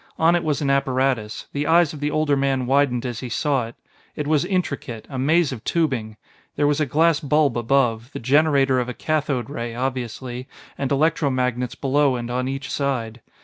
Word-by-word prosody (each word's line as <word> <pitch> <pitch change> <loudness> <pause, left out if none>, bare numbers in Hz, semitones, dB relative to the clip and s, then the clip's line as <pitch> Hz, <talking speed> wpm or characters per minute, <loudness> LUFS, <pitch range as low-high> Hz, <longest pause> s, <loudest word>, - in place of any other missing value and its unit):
On 165 +2 +4
it 175 - 0
was 150 -2 -1
an 140 - +2
apparatus; 130 -5 0
the 145 +1 -2
eyes 165 -1 +4
of 150 - -8
the 145 +1 -1
older 155 -1 +1
man 135 -2 0
widened 130 -2 +2
as 120 -3 -4
he 125 - -6
saw 135 -1 0
it. 115 - -12 0.4
It 150 - -3
was 150 -1 +2
intricate 150 - -3
a 130 - -4
maze 155 +3 +3
of 120 -4 -7
tubing. 130 -10 -1 0.4
There 145 - +1
was 145 +1 +2
a 150 - +1
glass 160 +3 +3
bulb 150 -3 +2
above 120 0 +1
the - - -6
generator 135 0 +3
of 125 0 -2
a 125 - -5
cathode 150 -6 -1
ray, 115 -3 -4
obviously 125 0 -4 0.3
and 135 -1 -3
electro 150 +1 +2
magnets 125 -1 -1
below 140 0 +2
and 120 0 -4
on 125 +1 -1
each 135 -1 -4
side. 125 -5 -2
135 Hz, 195 wpm, -22 LUFS, 125-150 Hz, 0.4 s, On